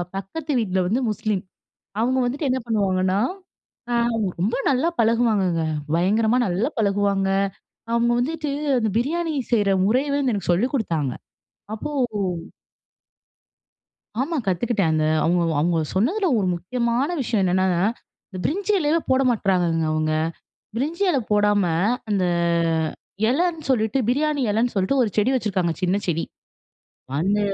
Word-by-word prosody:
பக்கத்து 285 - -5
வீட்டுல 190 -4 0
வந்து 230 +8 0
முஸ்லீம். 215 -3 -2 0.6
அவுங்க 255 +3 +2
வந்துட்டு 275 +4 -2
என்ன 260 +1 +1
பண்ணுவாங்கன்னா 190 -4 +1 0.7
அ - - +1 0.5
ரொம்ப 200 +7 +1
நல்லா 275 +4 +2
பழகுவாங்கங்க. 220 -7 +2 0.3
பயங்கரமா 215 +7 +2
நல்லா 190 +9 0
பழகுவாங்க, 200 -2 +1 0.6
அவுங்க 235 0 +2
வந்துட்டு, 305 +4 -2 0.3
அந்த 220 -3 +1
பிரியாணி 320 +7 -1 0.2
செய்ற 205 -3 +3 0.2
முறையவே 275 +7 +1
எனக்கு 205 -9 -1
சொல்லிக் 215 +11 +1
குடுத்தாங்க 160 - -1 0.6
அப்போ 220 - -5 2.3
ஆமா, 325 +4 -2
கத்துக்கிட்டேன் 195 -1 +1
அங்க. 155 -1 +1 0.2
அவுங்க 175 +1 +2 0.2
அவுங்க 170 +2 +1 0.2
சொன்னதுல 335 - +1
ஒரு 195 - 0
முக்கியமான 235 - -1
விஷயம் 225 -5 0
என்னன்னா, 185 +1 +2 0.6
இந்த 190 - -8
பிரிஞ்சி 400 +6 0
எலையே 315 0 +2
போட 260 +1 +4
மாட்றாங்கங்க 180 -7 +1
அவுங்க. 155 0 0 0.6
பிரிஞ்சி 310 +10 -2
எலை 280 -6 +1
போடாம 205 -1 +3 0.5
அந்த 195 -3 +1 1.1
எலைன்னு 325 +3 0
சொல்லீட்டு 220 0 +1
பிரியாணி 290 +2 +1
எலைன்னு 230 +4 +1
சொல்லீட்டு 200 +8 +1
ஒரு 225 - 0
செடி 210 +4 +3
வச்சிருக்காங்க, 195 -8 0
சின்ன 180 +2 +2
செடி. 165 -2 0 1.0
அந்த 200 +5 +1
220 Hz, 120 wpm, -23 LUFS, 190-260 Hz, 2.3 s, போட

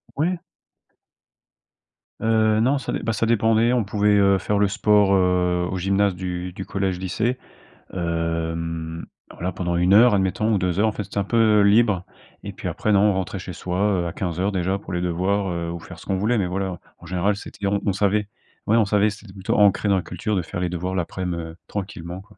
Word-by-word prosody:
Ouais. 170 +4 0 1.8
Heu, 110 -1 +2
non 130 +6 +3
ça 135 - -4
dep - - -3
bah, 115 - 0
ça 110 +2 0
dépendait. 115 +1 +3
On 120 -3 +2
pouvait, 105 0 +2
heu, 100 -1 +4
faire 100 +2 -1
le 100 - +4
sport, 100 0 +3
heu, 90 -1 +2
au 95 - -2
gymnase 100 +1 +1
du 90 0 -4
du 95 +1 -7
collège 95 -2 -2
lycée, 105 +7 -1 0.6
hem, 85 -1 -3 0.2
alors, - - -14
là, 90 +2 -1
pendant 85 -1 -2
1 90 +2 +3
heure 120 +3 +7
admettons 100 +3 +1
ou - - +3
2 90 0 -1
heures. 110 - +4
En - - +1
fait, 105 - -4
c'était 100 - -9
un 100 - +2
peu 110 0 +3
libre. 100 -2 +3 0.4
Et - - -5
puis - - -6
après, 110 - -1
non, 100 -1 +5
on - - +2
rentrait 95 +1 -3
chez 90 0 -7
soit, 90 +1 -4 0.2
heu, 85 - -2
à 85 - -5
15:00 90 +2 -2
déjà, 95 0 0
pour 100 - -9
les 90 - -1
devoirs, 95 +3 0
heu, 85 -1 -3
ou 85 - -5
faire - - -11
ce - - -13
qu'on 95 - -1
voulait. 110 +5 +1
Mais 95 -4 0
voilà, 95 -1 -3 0.2
en - - -14
général 95 +3 0
c'était 100 - -8
on 100 +1 +1
on 100 - +1
savait. 100 +2 +1 0.4
Ouais, 110 - +4
on 110 - +4
savait 105 +1 +3
c'était 105 -2 -11
plutôt 95 -1 -2
ancré 105 0 +4
dans 100 - +4
la 95 - +1
culture 110 +3 -3
de 95 - +1
faire 85 - -6
les 90 0 -1
devoirs 90 +2 -3
l'aprem, 90 0 -3
heu, 80 -1 -6
tranquillement, 90 -3 -6
quoi. 105 +1 -21
95 Hz, 225 wpm, -23 LUFS, 90-105 Hz, 1.8 s, heure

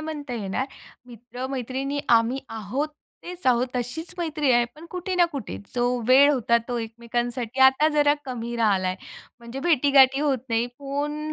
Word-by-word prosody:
म्हणता 295 -5 -5
येणार. 210 +4 -2 0.4
मित्र-मैत्रिणी 260 +3 -4
आम्ही 230 +2 +3
आहोत 225 +7 -3 0.3
तेच 355 -4 -8
आहोत, 250 0 +3
तशीच 250 +7 -4
मैत्री 310 -4 0
आहे 240 0 +4
पण 315 +2 -13
कुठे 365 +1 -4
ना 355 -1 +5
कुठे 245 - -5 0.2
जो 245 0 +1 0.2
वेळ 280 +3 +7
होता 235 -3 +2
तो 245 - -2
एकमेकांसाठी 235 +2 -4
आता 265 +4 +6
जरा 290 -1 +4
कमी 240 -2 -5
राहिला 200 -5 +2
आहे. 185 - -2 0.4
म्हणजे 235 +3 -8
भेटीगाठी 275 -3 +4
होत 280 -3 +1
नाही. 230 +1 +1
फोन 295 +2 -3
260 Hz, 155 wpm, -24 LUFS, 235-290 Hz, 0.4 s, वेळ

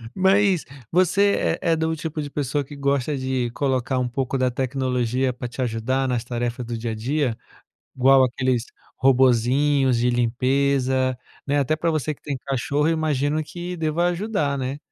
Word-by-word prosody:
Mas, 190 -1 +3 0.3
você 185 +3 +2
é 170 -3 +1
é - - +3
de 160 0 -1
um 160 0 0
tipo 155 -1 -4
de 145 - -5
pessoa 145 0 -1
que 145 +2 -11
gosta 140 0 0
de 130 -2 -1
colocar 130 0 0
um 125 - 0
pouco 135 +1 -2
da 130 -1 +2
tecnologia 130 -1 -1
pra 125 0 -6
te 120 +2 -6
ajudar 125 +3 -1
nas 125 -2 -1
tarefas 120 0 -3
do 115 -1 -4
dia 115 0 -3
a - - -4
dia? 130 +1 -1 0.6
Igual 130 +1 +6
aqueles 125 -1 0 0.3
robozinhos 130 +1 +3
de 125 +1 +2
limpeza, 130 +1 +1 0.3
né, 145 +1 +1
até 140 +2 +1
para 165 +2 0
você 155 -1 -1
que - - -30
tem 145 -2 -3
cachorro, 140 +3 0
eu - - +3
imagino 155 -1 0
que 175 +3 -6
deva 160 +2 0
ajudar, 175 -7 -1
né. 130 +2 -3
135 Hz, 175 wpm, -23 LUFS, 125-150 Hz, 0.6 s, Igual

